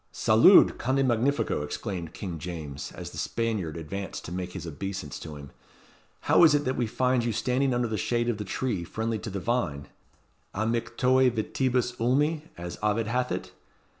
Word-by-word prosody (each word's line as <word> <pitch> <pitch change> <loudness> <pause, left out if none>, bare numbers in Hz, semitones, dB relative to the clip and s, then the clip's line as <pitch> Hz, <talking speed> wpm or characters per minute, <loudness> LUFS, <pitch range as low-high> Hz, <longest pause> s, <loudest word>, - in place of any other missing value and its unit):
"Salud! 115 - +6
Conde 135 +2 +1
magnifico!" 120 - +1
exclaimed 85 +2 -4
King 90 -5 -5
James, 75 -4 -6
as - - -7
the - - -7
Spaniard 105 -9 -2
advanced 95 +4 -6
to - - -7
make 90 0 -4
his 90 -3 -6
obeisance 85 -2 -5
to 80 -2 -8
him; 70 -2 -10 0.7
"how - - +5
is 155 -3 +7
it 145 - 0
that 130 - 0
we 120 - 0
find 125 +2 +1
you 115 - 0
standing 125 +4 +1
under 120 -1 +1
the 110 -2 -2
shade 120 +4 0
of 115 -3 -1
the - - -2
tree 105 -1 -2
friendly 110 +5 -3
to 110 - -6
the 100 0 -4
vine, 90 - -2 0.7
amictoe 120 +4 +2
vitibus 125 +2 0
ulmi 145 +7 +2 0.2
as 85 0 -7
Ovid 105 +1 +1
hath 125 +3 -1
it? - - -4
110 Hz, 175 wpm, -27 LUFS, 90-125 Hz, 0.7 s, is